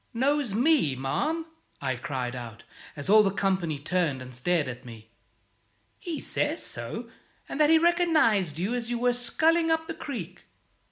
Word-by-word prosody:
"Knows 270 -3 +1
me, 250 - +3
ma'am?" 300 - -1 0.3
I 130 -2 -1
cried 125 0 -4
out, 115 -2 -8 0.3
as 145 - -6
all 215 +2 +7
the 200 - +2
company 190 -6 0
turned 160 -2 0
and 130 0 -9
stared 155 +4 +1
at 125 -1 -7
me. 110 -2 -12 0.9
"He 335 -3 -4
says - - -1
so, - - -5 0.4
and - - -5
that 300 -1 +5
he 325 - +7
recognized 315 - +3
you 190 +8 -1
as 240 -2 -3
you 240 - -1
were 245 +1 +2
sculling 320 +7 +2
up 320 0 +1
the 330 - -5
creek." 205 - -7
200 Hz, 165 wpm, -27 LUFS, -, 0.9 s, all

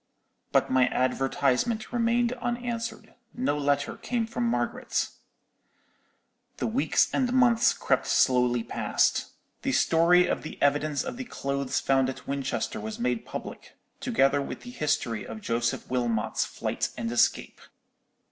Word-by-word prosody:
"But - - +2
my 130 -1 +4
advertisement 135 - 0
remained 235 0 +2
unanswered—no 240 - -4
letter 145 0 0
came 240 -2 -1
from 235 +1 -3
Margaret. 235 - -1 1.5
"The - - -2
weeks 240 +5 +2
and 255 -2 +1
months 245 -3 +4
crept - - 0
slowly 125 -2 +3
past. - - +1 0.3
The - - -1
story 175 +2 +4
of - - -1
the - - -8
evidence 145 +1 +1
of 255 -2 -5
the 255 - -5
clothes 140 - -2
found 135 -1 +2
at 130 - -8
Winchester 140 -5 -2
was 110 +1 -5
made 125 -1 -1
public, - - -8 0.2
together 135 +4 +2
with - - -6
the 245 - -9
history 150 - -1
of 110 - -7
Joseph 115 +1 -1
Wilmot's 115 -3 0
flight - - -3
and 115 -1 -3
escape. 120 - +1
145 Hz, 130 wpm, -27 LUFS, -, 1.5 s, my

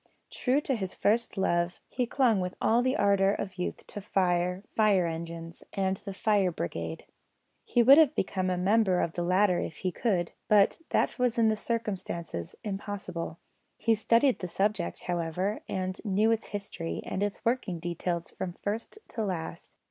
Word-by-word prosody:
True 265 +3 +1
to 275 - 0
his 190 -6 -3
first 225 +1 +1
love, 175 -2 +1
he 250 -1 -1
clung 235 -5 +3
with 180 0 -3
all 230 +2 +3
the 255 +1 +1
ardour 200 -1 +4
of 185 -2 -5
youth 180 - -3
to 205 - -7
fire, 180 -1 +1
fire 205 -5 +4
engines, 165 0 -6
and 190 -1 0
the 195 0 -7
fire 200 -3 +2
brigade. 85 - -4 0.6
He 240 - +3
would 275 +6 +9
have 305 -2 +5
become 185 -1 0
a 180 - 0
member 190 0 +3
of 165 - 0
the 175 - -3
latter 180 +1 +3
if 160 - -4
he 185 - +2
could, 180 -6 0 0.2
but 210 +8 +4
that - - +1
was 250 -1 +1
in 225 -1 +5
the 215 - +2
circumstances 195 - -4
impossible. 195 -5 -4 0.4
He 225 - +2
studied 230 +4 +3
the 180 - -4
subject, 195 0 -1
however, 175 +4 -2
and 185 0 -3
knew 210 +1 +2
its 225 -1 0
history 200 -5 -5
and 190 - -3
its 205 -1 -2
working 230 -7 0
details 170 0 -3
from 180 -2 -5
first 215 - -4
to 225 - -3
last. 180 -5 -5
195 Hz, 170 wpm, -29 LUFS, 175-220 Hz, 0.6 s, would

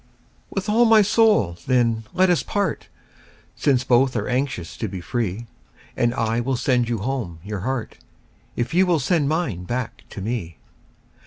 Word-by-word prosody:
TO....... - - -23
With 195 +1 -2
all 225 +3 +4
my 220 -2 +6
soul, 210 - +3
then, 115 -3 +2
let 185 0 +3
us 175 - +2
part, 205 -1 -2 0.7
Since 130 -3 +2
both 130 +1 +3
are 105 -2 -1
anxious 125 -9 -2
to 110 - -2
be 95 -1 -6
free; 115 +2 -3 0.5
And 120 - +2
I 115 -1 0
will 130 +2 0
sand 125 -2 +1
you 120 - 0
home 110 -6 -3
your 100 0 -4
heart, 120 +3 -4 0.6
If 120 +5 -2
you 185 +2 +4
will 175 -2 +3
send 145 +1 +1
mine 145 - -2
back 125 +3 -4
to - - -8
me. 100 -5 -4
125 Hz, 170 wpm, -22 LUFS, 110-155 Hz, 0.7 s, my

